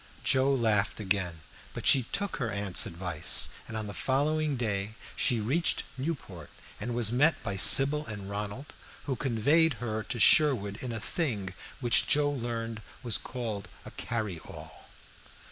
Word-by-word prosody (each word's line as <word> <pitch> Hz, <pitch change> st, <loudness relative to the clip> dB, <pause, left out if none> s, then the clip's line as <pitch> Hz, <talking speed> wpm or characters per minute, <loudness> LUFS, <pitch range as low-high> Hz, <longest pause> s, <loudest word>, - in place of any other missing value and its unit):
Joe 135 Hz, +1 st, +2 dB
laughed 110 Hz, -7 st, 0 dB
again, 95 Hz, -5 st, -2 dB, 0.3 s
but -, -, -7 dB
she 130 Hz, -4 st, +5 dB
took 200 Hz, 0 st, -3 dB
her 120 Hz, -4 st, -3 dB
aunt's 100 Hz, -2 st, +1 dB
advice; 85 Hz, -2 st, +1 dB, 0.2 s
and 110 Hz, -, -6 dB
on 110 Hz, -, -4 dB
the 105 Hz, -, -7 dB
following 145 Hz, -, 0 dB
day 105 Hz, -3 st, -3 dB, 0.2 s
she 120 Hz, -, +1 dB
reached 140 Hz, +11 st, -1 dB
Newport, 130 Hz, -, -6 dB, 0.3 s
and 120 Hz, +3 st, -4 dB
was 115 Hz, -3 st, +1 dB
met 145 Hz, +7 st, +3 dB
by 100 Hz, -2 st, -3 dB
Sybil 140 Hz, +9 st, +7 dB
and 100 Hz, -3 st, -7 dB
Ronald, 105 Hz, +7 st, -6 dB, 0.3 s
who 135 Hz, -3 st, -3 dB
conveyed 145 Hz, +6 st, +2 dB
her 110 Hz, -1 st, -4 dB
to 120 Hz, +3 st, -5 dB
Sherwood 110 Hz, -7 st, +4 dB
in 125 Hz, -, -5 dB
a 115 Hz, -, -5 dB
thing 105 Hz, -, -3 dB, 0.3 s
which 120 Hz, -2 st, +3 dB
Joe 145 Hz, 0 st, +2 dB
learned 115 Hz, -4 st, -5 dB, 0.2 s
was 120 Hz, -3 st, +1 dB
called 110 Hz, -6 st, -6 dB, 0.2 s
a -, -, -10 dB
"carryall." 85 Hz, -8 st, -7 dB
115 Hz, 150 wpm, -28 LUFS, 100-135 Hz, 0.3 s, Sybil